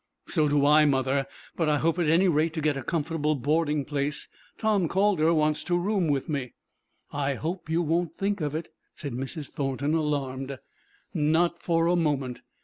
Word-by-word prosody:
"So 155 -4 +1
do 145 -1 +2
I, 150 +1 +6
mother; 135 -1 +1 0.3
but 165 -3 +1
I 150 - +3
hope 165 +4 +1
at 165 -3 +2
any 175 +4 +4
rate 160 -1 +2
to - - -1
get 150 -1 +1
a 135 - -3
comfortable 155 +1 -1
boarding 150 +1 0
place. 145 0 -2 0.3
Tom 210 -5 +2
Calder 190 -3 +2
wants 155 -2 +1
to 175 - +1
room 190 -1 0
with 140 -3 0
me." 140 -5 -3 0.6
"I 140 -1 -1
hope 165 +4 -4
you 165 +2 +1
won't 170 +2 -1
think 200 -1 -1
of 150 -1 -2
it," 160 +1 -4 0.3
said 140 -4 -5
Mrs. 135 +4 -5
Thornton, 140 +1 -1
alarmed. 140 -4 -2 0.6
"Not 165 +3 +1
for 165 -1 +1
a 175 +1 +3
moment. 140 -7 -1
155 Hz, 180 wpm, -27 LUFS, 140-170 Hz, 0.6 s, I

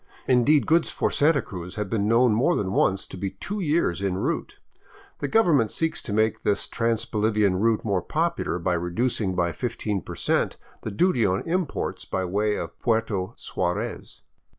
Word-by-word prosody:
Indeed, 130 +4 +4
goods 165 +1 +3
for - - -1
Santa 145 -3 +3
Cruz 90 0 -8
have 105 -1 -2
been 105 0 0
known 115 +1 +4
more 135 +11 +2
than 95 -2 -1
once 95 0 +1
to - - -10
be 95 +1 -2
two 205 - -6
years 150 - +1
en 95 -2 0
route. - - -2 0.6
The 145 - -2
government 150 - +3
seeks 160 +5 -1
to - - -7
make 110 +1 +1
this 100 - +1
trans 115 -1 0
Bolivian 105 -3 +1
route 115 +1 +1
more 100 -4 +1
popular 165 - -1
by 90 +1 0
reducing 95 +3 -1
by 85 -1 +1
15 110 -3 -3
percent - - -1 0.2
the - - -4
duty 125 - +2
on 95 -1 +1
imports 180 0 -2
by 95 -1 -2
way 105 +3 0
of 85 -3 -6
Puerto 110 -3 0
Suarez. 100 +6 -4
110 Hz, 175 wpm, -25 LUFS, 95-130 Hz, 0.6 s, Indeed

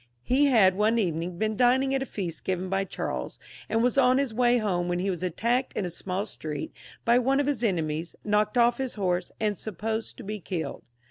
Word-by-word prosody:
He 275 +3 +3
had 215 -8 +5
one 215 +4 +2
evening 170 -3 -1
been 215 +2 0
dining 260 +3 +3
at 270 - +1
a 270 - -3
feast 175 -5 -5
given 185 0 -2
by 195 +1 0
Charles, - - -4 0.3
and 225 +1 +2
was 250 +2 +3
on 255 0 +5
his 275 -4 0
way 245 +1 +3
home, 185 -6 0
when 175 0 0
he 190 +2 0
was 180 - -4
attacked 235 +9 0
in 200 - -2
a - - -2
smaU 185 +3 -3
street 150 -7 -5 0.3
by 235 +1 +5
one 270 +3 +2
of 285 - +2
his 275 -5 -1
enemies, 165 -5 -1
knocked 210 +2 +1
off 240 +1 +4
his 260 -2 -2
horse, 180 -3 -1
and 210 -2 0
supposed 220 +2 -4
to - - -9
be 210 +1 -5
killed. 175 -3 -4
210 Hz, 215 wpm, -27 LUFS, 180-245 Hz, 0.3 s, had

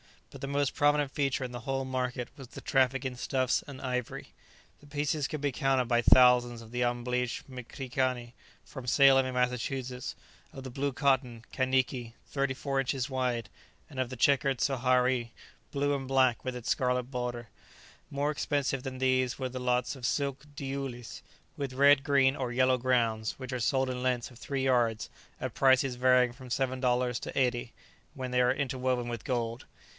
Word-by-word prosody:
But - - -11
the 140 - -3
most 140 0 0
prominent 145 -1 +2
feature 135 -3 0
in 125 - -4
the 120 - -6
whole 135 +2 -2
market 125 -2 -2
was 135 -3 -10
the - - -10
traffic 135 -1 +1
in 125 -1 -3
stuffs 130 0 0
and 140 -2 -9
ivory. 125 -2 -3 0.5
The 145 - -18
pieces 145 0 -1
could 155 -3 -5
be 145 -1 0
counted 135 -2 +1
by 120 0 +2
thousands 120 -1 +5
of 115 0 -13
the 125 0 -2
unbleached 120 0 -1
mcrikani 125 -1 -3 0.3
from 130 -3 -9
Salem 135 0 +6
in 130 - -4
Massachusetts, 125 0 -2 0.4
of 135 - -8
the 130 - -7
blue 140 +2 -1
cotton, 125 -4 +1
kaniki, 130 -2 0
thirty 140 -1 -1
four 135 +1 -2
inches 135 0 -1
wide, 125 -3 -1 0.4
and 130 - -8
of 130 -2 0
the 130 - -6
checked 135 +1 +2
sohari, 125 -2 +1 0.4
blue 145 0 0
and 135 -2 -3
black 130 -2 +3
with 130 -1 -3
its 120 -2 -5
scarlet 125 -1 +1
border. 120 -3 -4 0.6
More 145 +1 0
expensive 140 -3 -1
than 130 -1 -5
these 130 -1 +1
were 130 -1 -3
lots 125 0 -1
of 130 -2 -6
silk 140 +1 -1
diulis, 135 -3 -5 0.4
with 140 -2 -3
red, 140 +1 +5
green, 140 -2 +3
or 125 -2 -2
yellow 130 +1 +3
grounds, 115 -3 +1
which 130 -1 -7
are 125 - -2
sold 130 +3 +1
in 125 -1 -3
lengths 125 -1 -1
of 120 - -15
three 135 -2 -3
yards, 120 -4 +1 0.3
at - - -3
prices 130 -1 +3
varying 125 0 +4
from 130 +1 -12
seven 130 +1 -1
dollars 125 -1 +1
to - - -7
eighty, 125 -2 0 0.4
when 130 -1 -5
they 125 0 +3
are 125 0 +4
interwoven 130 -2 -1
with 120 -2 -5
gold. 115 -2 -2
130 Hz, 180 wpm, -30 LUFS, 125-135 Hz, 0.6 s, Salem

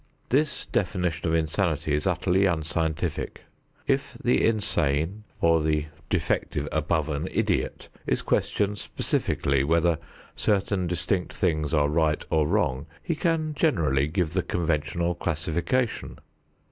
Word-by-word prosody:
This 145 +3 +1
definition 90 -4 -1
of 80 - +2
insanity 80 -1 0
is 75 +1 +1
utterly 95 +3 +2
unscientific. 80 -2 -2 0.4
If - - 0
the 65 - +3
insane 95 -3 +1
or 85 -1 +4
the 75 0 0 0.2
defective 75 0 0
above 80 0 0
an 75 -1 -2
idiot - - -1 0.2
is - - +1
questioned 105 0 0
specifically 70 -1 0
whether 85 +2 +2 0.4
certain 100 -3 +1
distinct 90 +2 -1
things 75 -6 0
are 75 -3 +3
right 75 0 +1
or 80 -2 +3
wrong, 65 +2 0 0.2
he 170 - 0
can 160 -2 0
generally 80 - +2
give 85 0 -1
the 95 - +2
conventional 85 0 0
classification. 85 - -1
80 Hz, 120 wpm, -26 LUFS, 75-95 Hz, 0.4 s, or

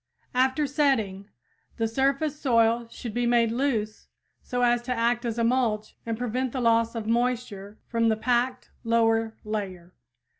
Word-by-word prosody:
After 260 +4 +2
setting, 225 -9 0 0.5
the 225 -1 +1
surface 275 +5 0
soil 230 -2 +2
should 230 -1 -7
be 245 0 0
made 235 -1 +3
loose, 230 -4 -1 0.3
so 245 0 -2
as 240 0 +3
to 245 +1 -5
act 240 0 +1
as 230 -1 -2
a 230 - +1
mulch 230 -3 0
and 225 -1 -2
prevent 245 +1 -2
the 260 - -2
loss 230 -1 +2
of 225 -2 -4
moisture 230 -3 -1
from 230 -1 +1
the 220 - +1
packed 250 +2 0
lower 225 -1 +1
layer. 190 -5 -5
235 Hz, 155 wpm, -26 LUFS, 225-250 Hz, 0.5 s, made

